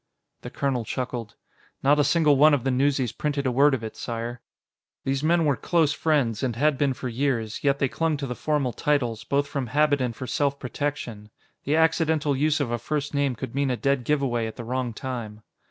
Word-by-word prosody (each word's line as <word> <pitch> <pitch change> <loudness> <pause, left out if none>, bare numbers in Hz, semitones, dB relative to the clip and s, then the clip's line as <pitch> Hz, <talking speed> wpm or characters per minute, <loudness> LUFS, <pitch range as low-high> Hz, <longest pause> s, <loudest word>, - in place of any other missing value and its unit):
The - - -7
colonel 135 -4 -1
chuckled. 120 -2 -4 0.5
"Not 145 +2 +4
a - - +5
single 150 0 +4
one 150 +2 +6
of 130 - -3
the 135 - +1
newsies 130 -2 +1
printed 145 -2 -2
a 130 - +2
word 140 +3 +4
of 120 - -7
it, 110 - -6
Sire." 115 0 -5 0.6
These 135 0 -1
men 165 +1 +3
were 145 -2 +3
close 160 +4 +1
friends, 140 -9 +1
and 125 -4 -1
had 150 +4 +2
been 135 -1 +1
for 130 - -5
years, 120 -3 -2
yet 140 -1 +3
they 140 - +1
clung 160 +3 -1
to 140 - -4
the 125 - -3
formal 140 -2 -1
titles, 125 -7 0
both 140 +1 +1
from 140 -3 -3
habit 145 +2 +2
and 125 -3 -1
for 130 - -6
self 140 +2 0
protection. 125 -6 -4 0.4
The 145 - +1
accidental 160 -2 +2
use 150 +3 +1
of 135 -5 -1
a 120 - -1
first 145 +4 -3
name 140 -3 +1
could 130 0 -6
mean 140 0 0
a 125 - 0
dead 140 -2 +1
giveaway 125 -4 0
at 110 - -7
the 120 - -7
wrong 125 +1 -2
time. 110 -3 -6
135 Hz, 215 wpm, -25 LUFS, 120-145 Hz, 0.6 s, one